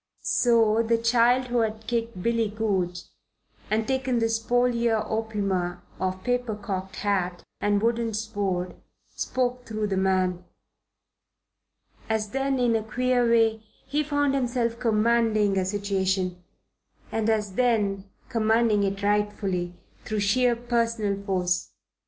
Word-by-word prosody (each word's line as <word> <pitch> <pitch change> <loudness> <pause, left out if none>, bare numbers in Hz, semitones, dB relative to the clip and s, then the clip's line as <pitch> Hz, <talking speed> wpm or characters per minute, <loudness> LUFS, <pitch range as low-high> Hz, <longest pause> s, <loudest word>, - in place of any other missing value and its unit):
So 230 -2 +3
the 230 0 +2
child 240 +2 +3
who 240 0 +1
had 220 -1 -1
kicked 230 -5 -2
Billy 230 -2 +1
Goodge 190 -5 -1 0.7
and 220 +1 0
taken 265 -2 0
the 225 -1 +1
spolia 235 0 +1
opima 200 -5 -2 0.2
of 185 0 -2
paper 245 -3 0
cocked 195 -2 -5
hat 185 -4 -1 0.2
and 205 0 +1
wooden 230 -1 0
sword 200 -5 -2 0.4
spoke 250 -1 -2
through 215 -1 -2
the 195 -2 -1
man. 185 -1 +1 1.7
As 220 -1 0
then, 270 0 0
in 240 -2 +2
a 225 - +1
queer 245 +2 +1
way, 225 -1 +3 0.2
he 295 +2 0
found 290 -1 +1
himself 240 -3 0
commanding 220 -3 +2
a 190 -1 +1
situation; 190 -2 -1 0.7
and 225 0 0
as 210 -3 0
then, 205 -4 +1 0.2
commanding 225 -3 +2
it 200 0 -2
rightfully, 200 -4 0 0.3
through 215 -1 -2
sheer 240 +4 +3
personal 230 -4 -1
force. 180 -2 0
220 Hz, 125 wpm, -26 LUFS, 195-235 Hz, 1.7 s, So